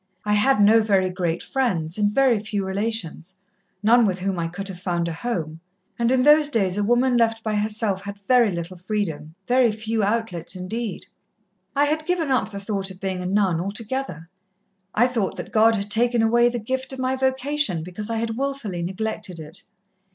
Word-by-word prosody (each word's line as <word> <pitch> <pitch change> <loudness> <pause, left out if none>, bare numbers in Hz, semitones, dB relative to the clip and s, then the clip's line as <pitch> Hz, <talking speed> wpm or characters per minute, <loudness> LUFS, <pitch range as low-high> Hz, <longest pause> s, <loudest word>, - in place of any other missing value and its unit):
I 210 - +1
had 210 +4 +3
no 215 +2 +6
very 195 -4 +2
great 175 -2 -2
friends, 185 -10 -1
and 205 -1 +3
very 250 0 +3
few 205 -2 -3
relations 190 -3 -3 0.5
none 235 +3 +5
with 185 -2 -1
whom 190 -1 -2
I 165 - -1
could 195 +4 -6
have 180 -2 -8
found 175 -2 -1
a 170 - -3
home; 165 -5 -4 0.4
and 235 +1 +2
in 260 -1 +3
those 295 +1 +6
days 195 -9 +1
a 205 - 0
woman 240 +3 +3
left 225 -1 +1
by 215 - -1
herself 210 -2 -1
had 200 0 -8
very 245 -3 +5
little 170 +1 -5
freedom, 175 -5 -3
very 250 -2 +4
few 220 +1 -2
outlets 200 -5 -1
indeed. 205 +3 -4 0.7
I 285 +1 +4
had 310 +1 -1
given 340 -5 0
up 255 - +1
the 200 -2 -6
thought 195 -1 -3
of 185 -1 -11
being 190 -1 -3
a 180 - -3
nun 190 -4 +1
altogether. 205 - -4 0.7
I 235 - +5
thought 235 -6 -1
that - - -7
God 225 +1 +5
had 200 0 -4
taken 235 +1 +3
away 235 +2 +4
the 240 - -3
gift 260 +4 -3
of 265 - -5
my 260 0 0
vocation 265 - 0
because 185 +5 -7
I 230 - -1
had 225 0 -1
wilfully 265 -9 -3
neglected 185 -1 -4
it. 155 0 -8
210 Hz, 195 wpm, -23 LUFS, 185-240 Hz, 0.7 s, no